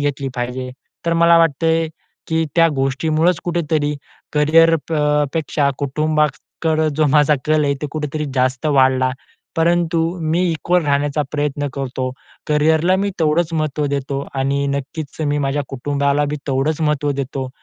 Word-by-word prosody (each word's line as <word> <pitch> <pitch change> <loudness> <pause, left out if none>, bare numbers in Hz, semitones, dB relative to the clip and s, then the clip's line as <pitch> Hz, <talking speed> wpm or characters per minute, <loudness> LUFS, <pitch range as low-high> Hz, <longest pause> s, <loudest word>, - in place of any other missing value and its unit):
घेतली 140 -1 -1
पाहिजे. 125 +1 -4 0.4
तर 170 - +2
मला 170 0 +5
वाटतं 165 -1 +2
आहे, 165 0 +2 0.4
की 160 0 0
त्या 165 -1 +6
गोष्टीमुळचं 155 +6 +1
कुठेतरी 155 -4 0 0.4
करिअर 165 +2 +5
प - - -4 0.4
पेक्षा 150 -2 0
कुटुंबाकडं 155 +2 0
जो 155 - +3
माझा 150 0 +5
कल 155 -1 +3
आहे 140 0 +1
ते - - -1
कुठेतरी 150 0 -3
जास्त 130 +2 0
वाढला. 130 -3 +3 0.5
परंतु 170 0 +2 0.2
मी 160 +3 +1
इक्वल 170 +1 0
राहण्याचा 145 +1 +1
प्रयत्न 145 -1 -1
करतो. 130 -1 -3 0.4
करिअरला 160 +4 +3
मी 200 +1 0
तेवढंच 160 +2 +1
महत्त्व 155 -2 -1
देतो 140 0 -2
आणि 140 +1 0
नक्कीच, 140 +3 -6
मी 145 0 0
माझ्या 145 +1 -1
कुटुंबाला 140 +2 0
बी 150 - -2
तेवढंच 140 +4 0
महत्त्व 150 -2 +1
देतो. 130 0 -5
150 Hz, 145 wpm, -19 LUFS, 140-160 Hz, 0.5 s, त्या